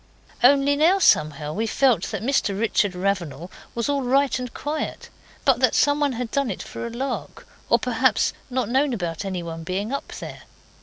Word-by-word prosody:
Only 280 +2 +5
now 330 +6 +4
somehow 150 - +2
we 220 +5 -1
felt 260 +1 +2
that - - -4
Mr 220 -6 0
Richard 210 -3 +1
Ravenal 180 -3 -2 0.2
was 235 -1 -1
all 285 -1 0
right 270 +1 +2
and 250 -1 -5
quiet, 300 +1 -4 0.4
but 265 -4 +4
that 255 - +3
some 290 0 +3
one 285 -2 +1
had 240 -1 -4
done 280 -3 0
it 190 - -4
for - - -6
a - - -5
lark, 255 +4 -5 0.2
or - - +5
perhaps - - +1 0.2
not 255 -3 -1
known 265 +3 +1
about 175 -2 -4
anyone 170 -4 -5
being 195 +7 -3
up 280 - -3
there. - - -8
240 Hz, 185 wpm, -23 LUFS, 190-275 Hz, 0.4 s, Only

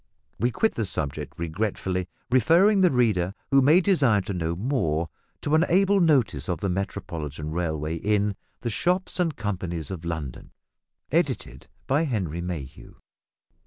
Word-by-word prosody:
We 120 +4 +2
quit 220 - +1
the 110 - -1
subject 75 -4 -4
regretfully; 90 +1 -2 0.2
referring 175 - +5
the 180 - +6
reader, 105 - +1 0.2
who 135 0 +6
may 155 +7 +6
desire 135 - +3
to 95 +2 -4
know 85 -2 -2
more, 85 - 0 0.3
to 145 - -1
an 160 +1 +5
able 195 +3 +4
notice 140 - +2
of 90 - -1
the 100 - -1
Metropolitan 80 -6 -4
Railway 80 -1 -2
in 105 +2 +1 0.3
"The 120 - -2
Shops 180 - 0
and 165 -4 +1
Companies 90 - -4
of 90 -3 -6
London," 80 -7 -5 0.6
edited 65 +2 -1 0.2
by 145 +5 +2
Henry 95 - -2
Mayhew. 85 -7 -7
100 Hz, 145 wpm, -25 LUFS, 85-135 Hz, 0.6 s, the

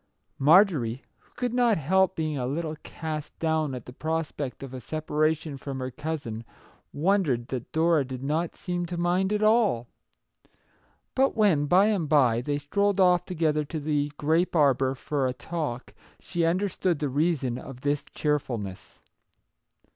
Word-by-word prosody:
Mar 165 +9 +7
jorie, 130 - -4 0.2
who - - -32
could 245 -2 -2
not 240 -3 +3
help 190 +5 +2
being 155 -2 -2
a 125 -3 -2
little 155 +3 -3
cast 155 -2 -6
down 160 -4 0
at 125 - -8
the 125 - -10
prospect 155 -3 -3
of 135 -1 -8
a 130 - -6
separation 155 +1 -1
from 135 0 -6
her 130 0 -4
cousin, 145 -6 -5 0.5
wondered 150 -8 +1
that 125 -3 -5
Dora 160 -2 +3
did 130 0 -7
not 160 +4 -1
seem 175 -1 -3
to 175 0 -5
mind 180 +3 +1
at 210 0 +1
all. 215 - +3 1.3
But 270 +1 +2
when, 180 -10 +3
by 185 +6 +5
and 195 -8 0
by, 125 -6 +4
they 145 +3 -1
strolled 200 +7 0
off 180 -2 +4
together 155 -4 0
to 155 +2 -5
the 145 -1 -1
grape 165 +5 +1
arbour 135 -3 +3
for 135 0 -1
a 125 - -2
talk, 145 -5 -5 0.3
she 170 -2 -1
understood 180 0 0
the 145 - -1
reason 140 -3 0
of 130 -2 -10
this 145 +1 0
cheer 150 -1 +1
fulness. 105 -8 -7
155 Hz, 160 wpm, -27 LUFS, 135-175 Hz, 1.3 s, Mar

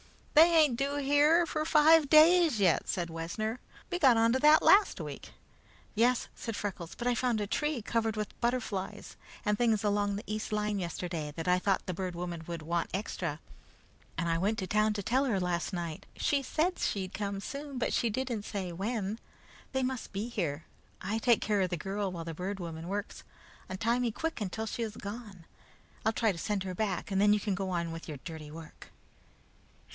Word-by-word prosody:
"They 320 +3 +8
ain't 300 -7 +5
due 280 +2 -1
here 290 +4 +4
for 310 -1 -2
five 310 -1 +5
days 320 -4 +6
yet," 185 -5 +3
said 170 -3 -2
Wessner. 215 +8 -3 0.3
"We 355 - -1
got 260 -8 +6
on 230 +1 +4
to 260 - +2
that 300 +2 +6
last 405 +1 +5
week." - - -7 0.6
"Yes," 240 +3 +2
said 230 -2 -5
Freckles, 190 -5 -5
"but 240 - -6
I 245 - +3
found 240 -2 0
a 205 - -1
tree 295 +2 -1
covered 225 -1 0
with 210 -2 -5
butterflies 235 -6 -2 0.3
and 210 - +2
things 225 -2 +2
along 205 -1 +1
the 205 - -5
east 215 +1 -4
line 210 -1 0
yesterday 170 -3 -4
that 165 0 -5
I 180 0 +4
thought 195 +1 0
the 185 - -3
Bird 180 0 -4
Woman 170 -1 -5
would 170 -2 -5
want 170 +1 -1
extra, 175 -6 -3 0.8
and 170 +1 -1
I 165 0 +1
went 205 +5 +1
to 185 - -3
town 215 +1 +2
to 205 -1 -4
tell 260 +7 +2
her 220 -7 +1
last 175 -2 -1
night. 170 -4 -5
She 285 -1 +1
said 320 +7 0
she'd 190 -2 -2
come 200 -1 -3
soon, 280 +6 -6
but 245 - -1
she 235 - +2
didn't 240 -2 -2
say 195 -4 -4
when. 205 +3 -3 0.5
They 265 -1 0
must 255 -2 -3
be 205 +4 -3
here. 170 -10 -3 0.3
I 205 +4 -2
take 235 0 +3
care 210 -2 +1
of 185 - +1
the 175 - -2
girl 195 +3 -3
while 170 -2 -6
the 165 - -5
Bird 190 +4 -4
Woman 165 -1 -6
works. 205 +3 -4 0.5
Untie 230 +6 0
me 245 -2 0
quick 325 +2 -3
until 210 +3 -3
she 225 - -4
is 220 -2 -4
gone. 205 -4 -8 0.6
I'll 220 - +2
try 225 -1 +2
to 180 - -7
send 205 0 -1
her 185 -1 -4
back, 200 0 -2
and 195 0 +2
then 205 0 +6
you 210 - +2
can 205 0 -1
go 190 0 -2
on 170 -2 -1
with 165 0 -7
your 150 -3 -6
dirty 160 -3 -7
work." 160 +1 -11
210 Hz, 205 wpm, -31 LUFS, 180-245 Hz, 0.8 s, They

